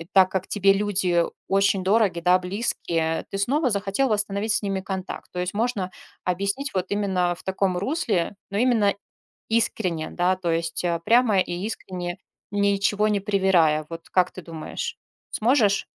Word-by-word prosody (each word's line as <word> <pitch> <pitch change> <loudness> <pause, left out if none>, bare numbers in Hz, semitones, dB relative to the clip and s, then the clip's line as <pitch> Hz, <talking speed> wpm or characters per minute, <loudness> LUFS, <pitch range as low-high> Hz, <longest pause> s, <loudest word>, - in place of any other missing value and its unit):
э, 165 - -7
так 190 -1 +6
как 190 -1 -2
тебе 195 -1 +3
люди 190 -4 +1 0.2
очень 195 0 +2
дороги, 195 -2 +2
да, 180 +2 +4
близкие, 175 -4 -1
ты 195 - -3
снова 265 +8 +2
захотел 200 +5 0
восстановить 205 0 0
с - - +1
ними 195 -1 -1
контакт. 190 -1 -5
То 180 - -3
есть 180 +2 -3
можно 215 -4 -1 0.3
объяснить 200 +10 -1
вот 185 -1 -1
именно 190 -4 +1
в - - -14
таком 190 -1 0
русле, 205 - -1
но 200 - -2
именно 225 -4 +3 0.6
искренне, 190 -8 0
да, 180 +1 +1
то 185 -2 -3
есть, 165 +1 -1
а, 170 -1 +1
прямо 230 +2 +3
и 185 - 0
искренне, 180 -2 -4 0.3
ничего 200 +1 +2
не 210 -1 +1
привирая. 190 -6 +2
Вот 165 0 -9
как 180 -1 +2
ты 185 - -9
думаешь, 165 -2 -6 0.3
сможешь? 215 -4 +2
195 Hz, 160 wpm, -24 LUFS, 180-205 Hz, 0.6 s, так